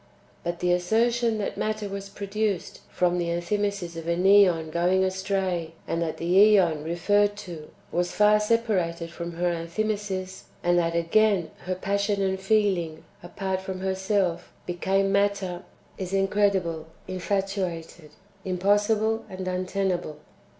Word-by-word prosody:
But 175 Hz, 0 st, -3 dB
the 180 Hz, 0 st, +2 dB
assertion 230 Hz, +5 st, +2 dB
that 205 Hz, -, -3 dB
matter 215 Hz, -1 st, -2 dB
was 195 Hz, 0 st, -6 dB
produced 200 Hz, -1 st, -3 dB
from 180 Hz, 0 st, +1 dB
the 170 Hz, -, -1 dB
Enthymesis 175 Hz, +1 st, -2 dB
of 165 Hz, 0 st, -7 dB
an 170 Hz, +1 st, 0 dB
^on 185 Hz, -5 st, +5 dB
going 180 Hz, +3 st, +2 dB
astray, 185 Hz, -3 st, -1 dB
and 165 Hz, -, -1 dB
that 165 Hz, -2 st, -2 dB
the 165 Hz, -, -5 dB, 0.3 s
^Eon 165 Hz, -6 st, +2 dB
[referred 205 Hz, +5 st, +2 dB
to] 160 Hz, -4 st, -9 dB, 0.2 s
was 175 Hz, 0 st, 0 dB
far 210 Hz, 0 st, +4 dB
separated 195 Hz, -7 st, 0 dB
from 170 Hz, 0 st, -6 dB
her 175 Hz, +1 st, 0 dB
Enthymesis, 190 Hz, +2 st, -3 dB, 0.2 s
and 175 Hz, 0 st, +3 dB
that, 170 Hz, -1 st, 0 dB
again, 180 Hz, +1 st, +2 dB
her 185 Hz, 0 st, -1 dB
passion 200 Hz, +2 st, 0 dB
and 190 Hz, -1 st, 0 dB
feeling, 190 Hz, -6 st, +1 dB, 0.2 s
apart 190 Hz, +1 st, -3 dB
from 190 Hz, -1 st, -6 dB
herself, 190 Hz, -2 st, -1 dB
became 195 Hz, +2 st, 0 dB
matter 200 Hz, -3 st, 0 dB, 0.2 s
— -, -, -31 dB
is 190 Hz, 0 st, -4 dB
incredible, 195 Hz, -5 st, +1 dB, 0.2 s
infatuated, 185 Hz, -4 st, -3 dB, 0.3 s
impossible, 205 Hz, +4 st, +1 dB
and 185 Hz, 0 st, -6 dB
untenable. 185 Hz, -3 st, -2 dB
190 Hz, 135 wpm, -26 LUFS, 175-200 Hz, 0.3 s, ^on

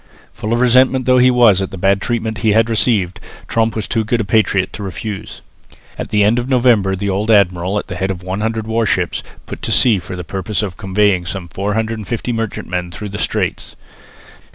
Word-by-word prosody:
Full 105 Hz, -, -5 dB
of 120 Hz, -, +2 dB
resentment 130 Hz, +1 st, +4 dB
though 130 Hz, 0 st, +4 dB
he 125 Hz, +1 st, +6 dB
was 120 Hz, -6 st, +5 dB
at 95 Hz, -, -2 dB
the 95 Hz, -, -8 dB
bad 95 Hz, +2 st, +2 dB
treatment 110 Hz, -2 st, -2 dB
he 110 Hz, -2 st, +2 dB
had 115 Hz, +1 st, +3 dB
received, 105 Hz, -4 st, +1 dB, 0.3 s
Tromp 115 Hz, -1 st, 0 dB
was 110 Hz, -3 st, -3 dB
too 115 Hz, -2 st, 0 dB
good 115 Hz, +2 st, 0 dB
a -, -, 0 dB
patriot 100 Hz, -2 st, +1 dB
to -, -, -7 dB
refuse. 105 Hz, +1 st, -6 dB, 0.5 s
At -, -, -6 dB
the 105 Hz, -1 st, +3 dB
end 110 Hz, +4 st, +3 dB
of 120 Hz, +2 st, -4 dB
November 120 Hz, -7 st, +3 dB
the 100 Hz, +2 st, -3 dB
old 100 Hz, +4 st, -2 dB
admiral 95 Hz, -2 st, +3 dB
at -, -, -2 dB
the 90 Hz, -, -7 dB
head 95 Hz, +2 st, -1 dB
of 90 Hz, -2 st, -4 dB
100 110 Hz, +4 st, -2 dB
warships 110 Hz, 0 st, 0 dB, 0.2 s
put -, -, -8 dB
to -, -, -3 dB
sea 115 Hz, -6 st, +4 dB
for 90 Hz, +2 st, -7 dB
the 90 Hz, -, -6 dB
purpose 95 Hz, +4 st, -3 dB
of 95 Hz, -4 st, -4 dB
convoying 95 Hz, -2 st, +1 dB
some 95 Hz, -2 st, -4 dB
450 110 Hz, +4 st, -2 dB
merchantmen 90 Hz, -5 st, -3 dB
through 105 Hz, +4 st, -7 dB
the 100 Hz, +1 st, -6 dB
Straits. -, -, -2 dB
105 Hz, 200 wpm, -17 LUFS, 95-115 Hz, 0.5 s, he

